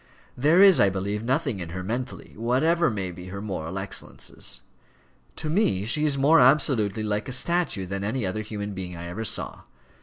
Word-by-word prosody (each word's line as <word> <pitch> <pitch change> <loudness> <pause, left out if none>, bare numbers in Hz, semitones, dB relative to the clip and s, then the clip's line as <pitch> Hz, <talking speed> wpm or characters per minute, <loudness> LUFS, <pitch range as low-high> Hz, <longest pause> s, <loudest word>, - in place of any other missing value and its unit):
There 155 +9 +5
is, 195 -3 +8
I 100 - +5
believe, 100 +2 -3
nothing 135 -3 0
in 85 -2 -5
her 90 +2 -5
mentally, 120 +6 -5
whatever 155 +10 +2
may 95 -5 -3
be 90 +1 -10
her 100 +2 -6
moral 95 -4 -5
excellences. 95 0 -5 0.7
To - - -5
me 150 - +1
she 150 +7 +2
is 145 -2 +1
more 150 +4 +5
absolutely 125 -6 +3
like 105 +1 -2
a - - -4
statue 165 - +1
than 100 +1 -4
any 110 +2 -1
other 95 +3 -2
human 105 -1 -5
being 90 -2 -6
I 85 - -7
ever 90 +6 -5
saw. - - -3
110 Hz, 185 wpm, -25 LUFS, 95-135 Hz, 0.7 s, is